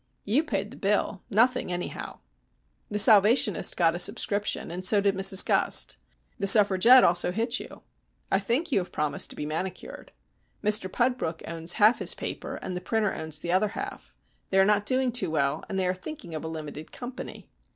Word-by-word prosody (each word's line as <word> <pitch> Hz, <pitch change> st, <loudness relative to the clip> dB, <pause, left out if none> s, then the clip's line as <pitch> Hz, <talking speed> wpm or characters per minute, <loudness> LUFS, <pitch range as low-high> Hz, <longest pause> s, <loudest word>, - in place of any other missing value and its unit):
"You 245 Hz, +10 st, +1 dB
paid 205 Hz, -8 st, -4 dB
the -, -, -13 dB
bill. 200 Hz, -1 st, -2 dB
Nothing, 235 Hz, -1 st, +1 dB
anyhow." 175 Hz, 0 st, -7 dB, 0.7 s
"The 210 Hz, -, -4 dB
Salvationist 210 Hz, +1 st, +4 dB
got 165 Hz, -2 st, +2 dB
a 175 Hz, -, -6 dB
subscription, 205 Hz, +1 st, 0 dB
and 180 Hz, +2 st, -7 dB
so 205 Hz, +2 st, +3 dB
did 200 Hz, 0 st, 0 dB
Mrs 195 Hz, 0 st, +5 dB
Gust. -, -, +2 dB, 0.4 s
The 195 Hz, -, -2 dB
Suffragette 210 Hz, +5 st, +6 dB
also 175 Hz, +1 st, +3 dB
hit 230 Hz, +5 st, -1 dB
you. -, -, -12 dB, 0.5 s
I 195 Hz, -, +2 dB
think 250 Hz, -, -2 dB
you 250 Hz, -, +2 dB
have 180 Hz, -, -7 dB
promised 150 Hz, -1 st, -3 dB
to -, -, -11 dB
be 150 Hz, -, -6 dB
manicured. 175 Hz, +5 st, -7 dB, 0.5 s
Mr 210 Hz, -3 st, +3 dB
Pudbrook 240 Hz, -10 st, -2 dB
owns 165 Hz, +1 st, -1 dB
half 220 Hz, +2 st, +3 dB
his -, -, +1 dB
paper, -, -, -6 dB
and 185 Hz, -, -6 dB
the 180 Hz, -, -6 dB
printer 215 Hz, +1 st, -2 dB
owns 160 Hz, -1 st, -5 dB
the 170 Hz, +3 st, -4 dB
other 190 Hz, +4 st, +1 dB
half. -, -, -8 dB, 0.3 s
They 190 Hz, -, -1 dB
are 190 Hz, -, +4 dB
not 205 Hz, 0 st, +1 dB
doing 255 Hz, -1 st, 0 dB
too 215 Hz, -7 st, -1 dB
well, 145 Hz, -1 st, -2 dB
and 195 Hz, -, -4 dB
they 190 Hz, -, -1 dB
are 180 Hz, -, 0 dB
thinking 185 Hz, -, -10 dB
of 155 Hz, -, -6 dB
a -, -, -6 dB
limited 155 Hz, -1 st, -8 dB
company. 250 Hz, +1 st, -10 dB
195 Hz, 190 wpm, -25 LUFS, 175-220 Hz, 0.7 s, Suffragette